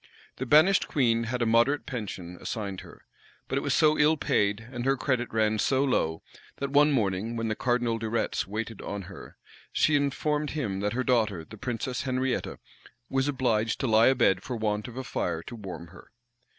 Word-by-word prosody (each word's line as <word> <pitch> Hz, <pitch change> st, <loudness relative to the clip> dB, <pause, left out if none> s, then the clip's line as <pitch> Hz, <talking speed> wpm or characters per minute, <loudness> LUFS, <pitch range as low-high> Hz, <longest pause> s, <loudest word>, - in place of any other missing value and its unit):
The 130 Hz, -, -4 dB
banished 160 Hz, +9 st, +5 dB
queen 115 Hz, -5 st, +2 dB
had 120 Hz, +1 st, -1 dB
a -, -, +1 dB
moderate 120 Hz, +6 st, +3 dB
pension 95 Hz, -8 st, -6 dB
assigned 100 Hz, -4 st, -4 dB
her; -, -, -15 dB, 0.4 s
but -, -, -2 dB
it -, -, +1 dB
was -, -, 0 dB
so 155 Hz, 0 st, +4 dB
ill 155 Hz, +1 st, +4 dB
paid, 105 Hz, -3 st, 0 dB
and 120 Hz, -2 st, -4 dB
her 135 Hz, +1 st, +2 dB
credit 125 Hz, -2 st, -1 dB
ran 110 Hz, -1 st, +1 dB
so 135 Hz, +5 st, +2 dB
low, 80 Hz, -, 0 dB, 0.3 s
that, 140 Hz, -1 st, -4 dB
one 145 Hz, +1 st, +5 dB
morning, 110 Hz, -2 st, 0 dB
when 115 Hz, -1 st, -2 dB
the 110 Hz, -, -1 dB
cardinal 120 Hz, -2 st, 0 dB
De 110 Hz, -1 st, -3 dB
Retz 115 Hz, -3 st, -1 dB
waited 110 Hz, +1 st, -5 dB
on 100 Hz, -1 st, -5 dB
her, 95 Hz, +1 st, -11 dB, 0.3 s
she 155 Hz, -, +3 dB
informed 150 Hz, +1 st, 0 dB
him 110 Hz, -11 st, -3 dB
that 105 Hz, +1 st, -1 dB
her 130 Hz, +2 st, 0 dB
daughter, 110 Hz, -10 st, +1 dB
the -, -, -11 dB
princess 125 Hz, -1 st, -3 dB
Henrietta, 130 Hz, -1 st, -1 dB, 0.5 s
was 135 Hz, +1 st, +1 dB
obliged 115 Hz, -5 st, 0 dB
to -, -, 0 dB
lie 110 Hz, -1 st, +5 dB
abed 120 Hz, -8 st, +3 dB
for 125 Hz, -, -5 dB
want 105 Hz, -1 st, -1 dB
of 125 Hz, 0 st, -10 dB
a 130 Hz, -, -3 dB
fire 85 Hz, -11 st, -2 dB
to 120 Hz, -, -8 dB
warm 90 Hz, -6 st, -8 dB
her. 90 Hz, -, -15 dB
115 Hz, 195 wpm, -27 LUFS, 105-130 Hz, 0.5 s, banished